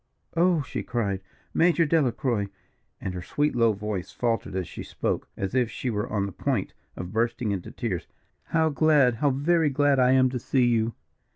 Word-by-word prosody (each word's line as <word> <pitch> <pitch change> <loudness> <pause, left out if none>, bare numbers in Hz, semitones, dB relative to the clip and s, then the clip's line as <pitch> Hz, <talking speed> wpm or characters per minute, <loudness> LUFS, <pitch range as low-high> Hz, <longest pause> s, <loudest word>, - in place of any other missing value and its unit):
"Oh!" 170 -2 +3
she - - -4
cried, 100 -6 -2 0.3
"Major 170 0 +4
Delacroix!" 130 -8 +1 0.5
and 95 - -4
her 90 - -5
sweet 145 - 0
low 115 -2 +4
voice 105 -2 -4
faltered 115 -5 -1
as 95 -2 -2
she - - -8
spoke, - - -2
as 95 +2 -3
if 125 -3 +2
she 125 - -3
were 105 -1 -2
on 100 -2 0
the 100 - -5
point - - -2 0.2
of 90 +2 -6
bursting 115 0 0
into 95 -3 -4
tears, 95 -9 -4 0.4
"how 160 -1 +2
glad, 145 -5 +4
how 145 - +2
very 155 +4 +2
glad 145 0 +3
I 125 0 +5
am 130 -1 +4
to 125 - -2
see 125 +1 +2
you." 115 -1 +1
120 Hz, 185 wpm, -26 LUFS, 105-145 Hz, 0.5 s, I